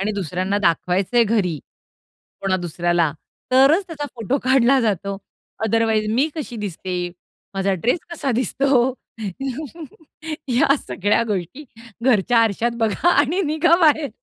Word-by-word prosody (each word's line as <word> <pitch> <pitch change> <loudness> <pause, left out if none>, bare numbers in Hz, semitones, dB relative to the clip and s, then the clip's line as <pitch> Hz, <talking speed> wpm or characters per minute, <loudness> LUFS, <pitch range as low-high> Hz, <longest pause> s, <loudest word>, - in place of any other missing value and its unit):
आणि 210 +2 -1
दुसऱ्यांना 190 +1 -2
दाखवायचंय 185 +6 +2
घरी, 200 -8 0 0.8
कोणा 190 -1 0
दुसऱ्याला, 175 -2 0 0.4
तरच 280 +9 +5
त्याचा 305 -4 -6
फोटो 245 +4 -1
काढला 260 0 +4
जातो. 200 -3 -1 0.5
अदरवाईज 220 -1 +1
मी 275 +6 +2
कशी 285 -7 -6
दिसते? 180 -3 -4 0.5
माझा 195 0 0
ड्रेस 235 - 0
कसा 290 -5 -3
दिसतो? 255 +2 +1 1.5
या 265 +3 +3
सगळ्या 205 +4 +1
गोष्टी 205 - -4 0.4
घरच्या 240 -1 +3
आरशात 225 +1 +2
बघा 225 - +1
आणि 290 +7 +2
निघा 315 +3 +3
बाहेर. 305 -3 +4
225 Hz, 120 wpm, -21 LUFS, 195-270 Hz, 1.5 s, तरच